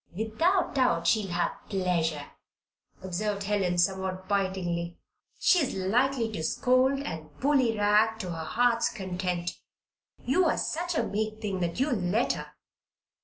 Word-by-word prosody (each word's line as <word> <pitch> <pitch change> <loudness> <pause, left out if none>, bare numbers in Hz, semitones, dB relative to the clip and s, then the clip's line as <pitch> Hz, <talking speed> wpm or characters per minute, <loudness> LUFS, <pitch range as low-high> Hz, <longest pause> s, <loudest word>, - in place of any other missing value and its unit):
"Without 330 - +1
doubt 250 -12 +2
she'll 210 +2 +2
have 175 0 0 0.2
pleasure," 170 -6 0 0.8
observed 200 +2 -2
Helen, 195 -3 0
somewhat 185 +1 0
bitingly. 185 -4 -1 0.4
"She 365 - +4
is 280 -9 -1
likely 230 +5 +1
to 185 - -4
scold 255 +10 +2
and 160 - -6
'bullyrag' 220 -5 +3
to 180 - -5
her 165 -1 -5
heart's 235 +4 +2
content. 180 -4 -3 0.7
You're 330 +6 +2
such 345 +1 -2
a - - +2
meek 215 +1 -2
thing 200 -4 -3
that 175 +4 -2
you'll 270 +1 +2
let 190 +7 +1
her." - - -6
205 Hz, 130 wpm, -28 LUFS, 180-245 Hz, 0.8 s, She